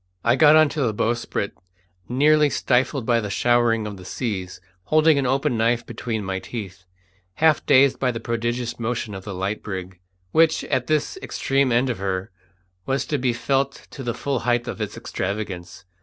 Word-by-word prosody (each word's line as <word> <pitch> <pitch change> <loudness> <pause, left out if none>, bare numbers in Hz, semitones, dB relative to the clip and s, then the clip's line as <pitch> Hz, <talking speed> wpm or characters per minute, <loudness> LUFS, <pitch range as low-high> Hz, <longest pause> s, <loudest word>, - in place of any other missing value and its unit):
I 120 +1 +4
got 150 +2 +6
on 155 0 +6
to 150 - -3
the 115 -5 0
bowsprit 115 -2 -1 0.6
nearly 150 +4 +4
stifled 130 -1 +1
by 120 -1 +3
the 105 - -4
showering 120 +1 +2
of 105 -2 -6
the 90 - -11
seas, 95 -3 -4 0.3
holding 155 -1 +4
an 135 - 0
open 135 +1 +1
knife 115 +1 +1
between 110 -2 -4
my 95 0 -2
teeth, 95 -4 -8 0.5
half 160 -2 +3
dazed 135 0 +5
by 130 - +1
the 115 -2 -3
prodigious 120 +1 -2
motion 115 -2 -3
of 95 -1 -8
the 100 -3 -5
light 95 +3 -2
brig, 95 -2 -6 0.3
which, 160 0 +3
at 130 -3 -1
this 155 - 0
extreme 135 - 0
end 125 +2 +2
of 115 - -5
her, 95 -1 -3 0.6
was 135 0 0
to 145 - -1
be 125 -1 +1
felt 135 +3 -1
to - - -8
the 120 -3 -3
full 140 -3 -2
height 120 0 0
of - - -5
its - - -4
extravagance. 95 -2 -5
120 Hz, 185 wpm, -23 LUFS, 105-135 Hz, 0.6 s, got